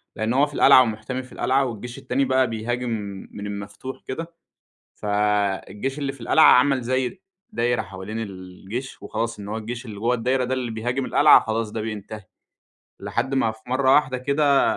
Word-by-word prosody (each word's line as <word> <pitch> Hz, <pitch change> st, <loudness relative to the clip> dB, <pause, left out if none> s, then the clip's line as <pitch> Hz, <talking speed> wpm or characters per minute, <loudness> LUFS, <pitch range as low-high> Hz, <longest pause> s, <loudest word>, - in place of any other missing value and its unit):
لإن 110 Hz, +2 st, -1 dB
هو 140 Hz, +3 st, +4 dB
في 145 Hz, -, -11 dB
القلعة 130 Hz, -, +7 dB
ومُحتمي 115 Hz, +2 st, -2 dB
في 125 Hz, -, -16 dB
القلعة 135 Hz, +1 st, +1 dB
والجيش 120 Hz, 0 st, -6 dB
التاني 135 Hz, +2 st, 0 dB
بقى 130 Hz, 0 st, +2 dB
بيهاجم 120 Hz, +2 st, -3 dB, 0.4 s
من 105 Hz, -, -7 dB
المفتوح 100 Hz, +6 st, -7 dB
كده. 165 Hz, +5 st, -5 dB, 0.6 s
فالجيش 105 Hz, +5 st, -1 dB
اللي 140 Hz, -2 st, -2 dB
في 135 Hz, -, -15 dB
القلعة 155 Hz, +7 st, +4 dB
عمل 130 Hz, +1 st, +4 dB
زي 130 Hz, +8 st, -2 dB, 0.3 s
دايرة 120 Hz, -, 0 dB
حوالين 95 Hz, +2 st, -7 dB
الجيش، 100 Hz, +4 st, -7 dB
وخلاص 115 Hz, 0 st, -3 dB
إن 100 Hz, -, -7 dB
هو 105 Hz, +2 st, -3 dB
الجيش 120 Hz, +3 st, -6 dB
اللي 105 Hz, -3 st, -8 dB
جوّا 115 Hz, +3 st, +1 dB
الدايرة 125 Hz, +2 st, 0 dB
ده 125 Hz, +1 st, -1 dB
اللي 125 Hz, -3 st, -2 dB
بيهاجم 120 Hz, +4 st, -2 dB
القلعة، 150 Hz, +1 st, +7 dB
خلاص 110 Hz, -1 st, -2 dB
ده 110 Hz, -, -3 dB
بينتهي. 110 Hz, -1 st, -6 dB, 0.8 s
لحد 135 Hz, +1 st, -2 dB
ما 125 Hz, -4 st, +2 dB
في 110 Hz, 0 st, -16 dB
مرّة 130 Hz, +1 st, +3 dB
واحدة 130 Hz, -3 st, +2 dB
كده 140 Hz, +2 st, +2 dB
120 Hz, 175 wpm, -23 LUFS, 110-130 Hz, 0.8 s, القلعة